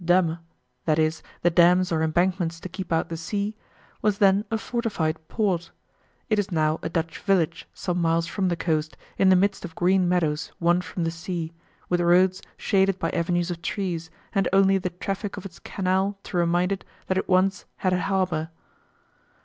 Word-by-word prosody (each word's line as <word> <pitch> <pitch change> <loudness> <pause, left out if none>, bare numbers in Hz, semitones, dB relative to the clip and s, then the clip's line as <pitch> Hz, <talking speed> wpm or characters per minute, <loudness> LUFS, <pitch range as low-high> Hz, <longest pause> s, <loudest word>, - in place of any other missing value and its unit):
Damme 170 -1 +3 0.5
(i.e. 155 0 +3 0.3
"the 175 - +4
dams 180 +2 +5
or 160 -1 +1
embankments 170 +1 +1
to - - -6
keep 185 +1 -7
out 165 - +1
the 165 - -4
sea") 205 +5 -3 0.5
was 210 -2 +2
then 200 +1 +4
a 225 - 0
fortified 210 -10 -2
port. 180 -7 0 0.6
It 215 -3 +2
is 205 0 -1
now 155 -3 +1
a - - -3
Dutch 165 -1 -2
village, 175 -5 +1
some 180 -1 -2
miles 165 0 +2
from 190 +3 -1
the 175 - +1
coast, 155 -2 -1 0.2
in 190 - +5
the 185 - +7
midst 195 +2 +1
of 165 -3 -7
green 180 0 +3
meadows 160 -4 0
won 175 +1 +3
from 175 0 -4
the 165 - 0
sea, 165 -1 -5 0.3
with 175 0 +1
roads 180 +2 +4 0.2
shaded 195 -2 +2
by - - -1
avenues 175 +1 0
of 170 -1 -5
trees, 170 -3 -3 0.2
and 195 -2 +2
only 195 0 +4
the 180 - -2
traffic 195 +3 -4
of 195 - -7
its 175 -3 -9
canal 190 +1 -1
to - - -8
remind 175 +2 +2
it 195 - -2 0.2
that 185 - 0
it - - -5
once 190 +1 +2
had 185 -1 0
a 180 - +1
harbour. 180 -4 0
180 Hz, 185 wpm, -25 LUFS, 165-195 Hz, 0.6 s, the